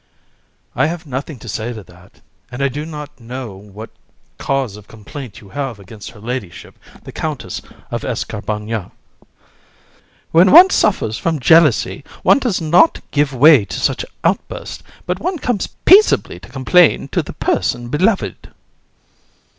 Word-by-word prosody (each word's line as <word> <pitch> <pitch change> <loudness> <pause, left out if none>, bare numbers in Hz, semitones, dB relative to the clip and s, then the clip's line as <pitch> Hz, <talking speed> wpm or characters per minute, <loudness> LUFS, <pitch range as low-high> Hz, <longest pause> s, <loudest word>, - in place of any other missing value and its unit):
VISC. 130 - -3
I - - +5
have 170 +1 -5
nothing 140 +1 -5
to 120 - -13
say 110 +3 -4
to 110 -3 -9
that, 90 +2 -20 0.3
and 125 +3 -4
I 140 - +2
do 150 +4 -5
not 150 -3 -9
know 120 -2 -7
what 105 +3 -11 0.5
cause 135 -6 -1
of 105 -1 -14
complaint 115 +1 -10
you 100 - -15
can - - -17
have 135 -6 -3
against 100 +2 -11
her 105 - -15
ladyship 110 -5 -6 0.3
the - - -10
Countess - - -5 0.3
of - - -3
Escarbagnas. 105 0 -4
COUN. - - -34 1.0
When 175 +3 +5
one 370 +3 +9
suffers 110 - +1
from 165 -3 -1
jealousy, 165 +6 +4 0.2
one - - +5
does 245 -8 -1
not 170 - +4
give 145 -1 +1
way 140 -1 +6
to 100 - -6
such - - 0 0.2
outbursts, - - -2 0.2
but 180 +1 -2
one 360 +2 -2
comes 245 -8 -2 0.2
peaceably 405 +4 +5
to - - -14
complain 145 +3 +3
to - - 0
the - - -9
person 120 0 -1
beloved. 190 - -1
135 Hz, 155 wpm, -18 LUFS, 110-165 Hz, 1.0 s, one